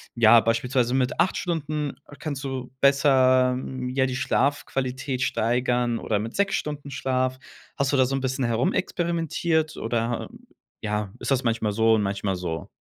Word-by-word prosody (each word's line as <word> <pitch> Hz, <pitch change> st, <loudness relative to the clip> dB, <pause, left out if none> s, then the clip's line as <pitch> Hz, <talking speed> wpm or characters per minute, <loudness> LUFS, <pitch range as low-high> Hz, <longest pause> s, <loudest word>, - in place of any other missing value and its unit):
ja, 115 Hz, 0 st, +7 dB
beispielsweise 120 Hz, +2 st, +1 dB
mit 130 Hz, -1 st, 0 dB
8 185 Hz, -, +2 dB
Stunden 155 Hz, -4 st, -2 dB, 0.3 s
kannst 145 Hz, -3 st, -4 dB
du 130 Hz, -2 st, -4 dB
besser, 130 Hz, -2 st, +4 dB
hm, 130 Hz, -1 st, -5 dB
ja, 130 Hz, +1 st, +1 dB
die 130 Hz, 0 st, -2 dB
Schlafqualität 135 Hz, -1 st, -1 dB
steigern 120 Hz, 0 st, +1 dB
oder 105 Hz, -2 st, -1 dB
mit 115 Hz, +3 st, -5 dB
6 200 Hz, 0 st, +1 dB
Stunden 145 Hz, -1 st, -4 dB
Schlaf? 130 Hz, -1 st, -1 dB, 0.4 s
Hast 140 Hz, +1 st, 0 dB
du -, -, +3 dB
da 130 Hz, -, +5 dB
so 135 Hz, -, -1 dB
'n -, -, -1 dB
bisschen 130 Hz, 0 st, -1 dB
herumexperimentiert, 165 Hz, -, 0 dB
oder, 115 Hz, +1 st, -2 dB
äh, -, -, -14 dB, 0.4 s
ja 105 Hz, -2 st, -2 dB
ist -, -, -4 dB
das 130 Hz, -1 st, +1 dB
manchmal 115 Hz, -2 st, +1 dB
so 110 Hz, +2 st, +3 dB
und 110 Hz, -, +3 dB
manchmal 100 Hz, -1 st, -1 dB
so? 85 Hz, -3 st, -4 dB
130 Hz, 165 wpm, -25 LUFS, 115-140 Hz, 0.4 s, ja